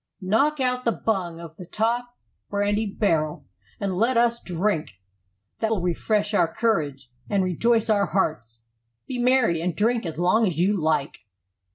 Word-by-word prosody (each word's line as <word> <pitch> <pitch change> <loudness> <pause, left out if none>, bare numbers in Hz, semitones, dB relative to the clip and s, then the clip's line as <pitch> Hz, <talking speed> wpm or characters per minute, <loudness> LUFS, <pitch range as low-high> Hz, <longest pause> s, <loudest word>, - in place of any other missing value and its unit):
"Knock 250 +11 +1
out 250 -1 0
the 230 - +2
bung 185 -8 -2
of 165 -2 -10
the 180 - -9
top 240 +4 -1 0.3
brandy 205 +1 0
barrel, 165 -7 -1 0.3
and 195 -1 -2
let 230 +7 +2
us 235 0 +2
drink; 175 - -1 0.7
that 220 - 0
will 220 -3 0
refresh 205 +4 0
our 170 -5 +2
courage 145 - -1 0.2
and 195 -2 +2
rejoice 225 +6 +2
our 205 -3 +2
hearts. 115 - -2 0.4
Be 250 - -4
merry 240 -9 +3
and 175 0 -2
drink 225 -1 +1
as 155 -2 -6
long 195 +6 +3
as 170 -5 -3
you 190 +5 +2
like." 155 -5 -1
205 Hz, 160 wpm, -24 LUFS, 170-230 Hz, 0.7 s, merry